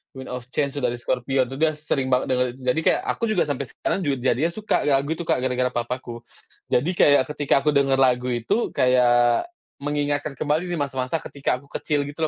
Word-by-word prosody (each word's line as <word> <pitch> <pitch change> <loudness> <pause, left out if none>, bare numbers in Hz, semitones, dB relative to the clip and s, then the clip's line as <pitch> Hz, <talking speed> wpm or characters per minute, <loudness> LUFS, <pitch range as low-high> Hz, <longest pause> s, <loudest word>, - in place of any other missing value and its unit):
"Wind 130 -1 -8
of 125 -1 -5
Change" 140 0 -1
tuh 135 - -3
dari 120 - 0
Scorpions 130 0 0
tuh 135 - -7
dia 160 -1 +3
sering 150 -3 -1
banget 125 - +2
denger 125 0 +2
itu. - - -18
Jadi 125 +4 +1
kayak - - +3
aku - - -3
juga 215 -5 +2
sampai 140 -1 -2
sekarang - - -2
juga 140 -1 +1
jadinya 135 +6 +1
suka 215 0 -1
lagu 140 +1 +2
itu, 170 - -4
Kak, - - +2
gara-gara 125 -1 0
papaku. 120 0 -4 0.5
Jadi 155 +9 +2
kayak 145 -5 +5
ketika 140 -1 +2
aku 150 - +3
dengar 135 -1 +3
lagu 125 -1 +3
itu 160 - 0
kayak 120 - +3 0.3
mengingatkan 145 0 -2
kembali 155 +6 -1
di 175 - -2
masa-masa 135 +1 -2
ketika 140 -2 -2
aku 140 - -17
kecil 145 -2 -1
gitu 155 +2 -2
135 Hz, 205 wpm, -23 LUFS, 125-150 Hz, 0.5 s, kayak